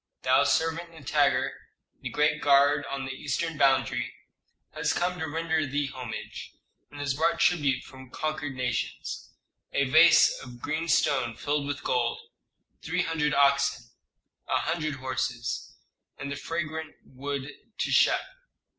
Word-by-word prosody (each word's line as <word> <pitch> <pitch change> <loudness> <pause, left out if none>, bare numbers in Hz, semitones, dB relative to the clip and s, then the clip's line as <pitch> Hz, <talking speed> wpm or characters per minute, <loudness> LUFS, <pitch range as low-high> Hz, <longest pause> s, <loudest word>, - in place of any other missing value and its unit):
Thy - - +4
servant 165 +1 +1
Nitager, 160 -5 +1 0.5
the - - -5
great 150 0 +1
guard 145 +1 +4
on 135 -1 -3
the 130 - -4
eastern 150 +5 -2
boundary, 130 -4 +2 0.6
has - - 0
come 180 +1 -1
to 160 -2 -3
render 160 0 0
thee 140 +1 -1
homage, 125 -4 -7 0.3
and 145 - -11
has 145 -2 0
brought 165 +4 +1
tribute 140 -7 +2
from 130 -2 -13
conquered 145 -1 -3
nations: 125 -1 -3 0.4
a 140 - +2
vase 155 +5 +7
of 125 -1 -11
green 155 +5 -2
stone 135 -7 +2
filled 145 +2 -1
with 145 -1 -4
gold, 120 -2 0 0.6
three - - 0
hundred 155 -2 0
oxen, 140 -4 +2 0.6
a - - +2
hundred 155 -3 -1
horses, 130 -2 -3 0.4
and 140 +1 -5
the - - -2
fragrant 160 0 -4
wood 140 +1 -5 0.3
teshep." - - +3
145 Hz, 135 wpm, -27 LUFS, 130-160 Hz, 0.6 s, vase